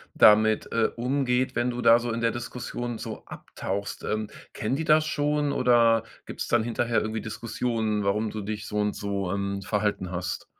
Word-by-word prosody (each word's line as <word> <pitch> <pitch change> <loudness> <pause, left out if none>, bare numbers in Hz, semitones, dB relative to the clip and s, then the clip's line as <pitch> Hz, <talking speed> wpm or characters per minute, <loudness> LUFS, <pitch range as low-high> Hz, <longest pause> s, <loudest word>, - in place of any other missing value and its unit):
damit, 110 0 +5
äh, 115 -1 +2
umgeht, 125 0 0
wenn 120 +1 0
du 125 0 -3
da 115 0 +7
so 120 -1 -3
in 115 - -3
der 115 - +2
Diskussion 120 0 -5
so - - -7
abtauchst. 100 +1 -5
Ähm, 110 0 -2 0.2
kennen 120 +6 -1
die 160 - -2
das 155 0 +4
schon 150 -1 0
oder 115 -4 +4 0.2
gibt's - - -5
dann 120 -2 +2
hinterher 120 0 0
irgendwie 110 +1 -3
Diskussionen, 110 -1 -2
warum 105 +2 +1
du 110 - -5
dich 105 +1 -5
so 105 - -4
und 105 0 0
so, 100 -2 -2
ähm, 100 0 -2
verhalten 105 -3 -1
hast? 90 0 -4
115 Hz, 180 wpm, -26 LUFS, 105-120 Hz, 0.2 s, da